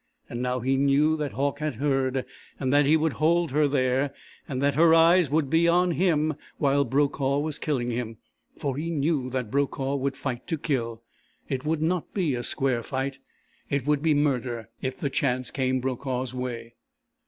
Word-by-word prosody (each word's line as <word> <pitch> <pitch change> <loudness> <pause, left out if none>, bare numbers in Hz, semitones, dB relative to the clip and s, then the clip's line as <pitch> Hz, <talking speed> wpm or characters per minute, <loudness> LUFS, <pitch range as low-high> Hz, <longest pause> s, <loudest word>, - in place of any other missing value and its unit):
And 120 - -5
now 125 0 -1
he 135 +2 +1
knew 140 +3 +3
that 150 -3 -3
Hauck 140 +4 -1
had 150 -4 -2
heard, 135 0 0 0.3
and 130 -1 0
that 145 -1 +4
he 155 +2 +5
would 160 -1 0
hold 170 0 +3
her 150 +1 +3
there, 135 0 +1 0.3
and 130 -3 -3
that 140 +1 +2
her 165 +2 +5
eyes 165 -1 +5
would 150 0 +1
be 165 +4 +3
on 175 +1 +3
him 155 -3 +2 0.2
while 140 -1 +3
Brokaw 140 +1 +1
was 150 0 -2
killing 125 -5 -1
him. 115 -2 -4 0.4
For 140 -2 -2
he 160 +3 -3
knew 145 -4 0
that 125 -4 -3
Brokaw 140 0 0
would 135 0 -2
fight 125 -3 -4
to 165 - -1
kill. 115 -7 -2 0.4
It 135 +1 -3
would 155 0 0
not 175 +1 -1
be 175 -8 +1
a 120 - -2
square 125 0 0
fight. 135 +2 -3 0.5
It 140 -2 -1
would 150 -1 +2
be 155 -1 +3
murder 125 -5 -1
if 130 0 -3
the 140 - -2
chance 130 -2 0
came 130 -1 0
Brokaw's 130 0 -3
way. 120 -2 -5
140 Hz, 190 wpm, -26 LUFS, 130-150 Hz, 0.5 s, he